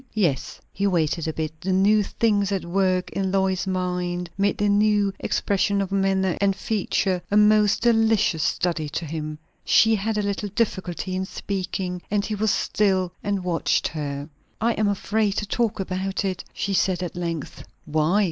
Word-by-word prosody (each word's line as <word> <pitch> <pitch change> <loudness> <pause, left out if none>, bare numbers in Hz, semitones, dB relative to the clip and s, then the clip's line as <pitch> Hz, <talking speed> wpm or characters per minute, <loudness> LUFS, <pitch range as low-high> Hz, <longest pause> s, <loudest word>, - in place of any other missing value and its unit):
"Yes." 165 -11 0
He 200 +1 0
waited 165 -3 0
a 160 - -2
bit. 155 0 -5
The 190 +1 -1
new 200 +3 +4
things 205 -1 +1
at 195 -3 -1
work 185 0 +1
in 190 -1 -1
Lois's 190 -1 +1
mind 180 -1 -2
made 200 +1 +1
the 205 - +1
new 205 -1 +3
expression 200 0 0
of 195 -1 -2
manner 195 -2 +1
and 195 -1 +3
feature 190 -3 -1
a 205 - +2
most 210 0 +4
delicious 225 -7 +3
study 165 -2 0
to 165 +3 -4
him. 155 0 -5 0.3
She 225 0 +5
had 215 +1 -1
a 210 - 0
little 200 +1 -2
difficulty 190 -4 -2
in 190 0 -1
speaking, 185 -2 -4
and 205 0 0
he 215 - -3
was 215 +1 0
still 190 -3 +1
and 200 -2 -1
watched 175 -2 +1
her. 145 -2 -4 0.3
"I 230 +2 +2
am 215 -1 +1
afraid 205 +1 0
to 210 - -1
talk 225 0 -1
about 190 +1 -2
it," 185 -2 -2
she 200 - -3
said 185 -1 +1
at 175 - -5
length, 170 -3 -4 0.2
"Why?" 155 +6 +2
190 Hz, 175 wpm, -24 LUFS, 180-205 Hz, 0.3 s, She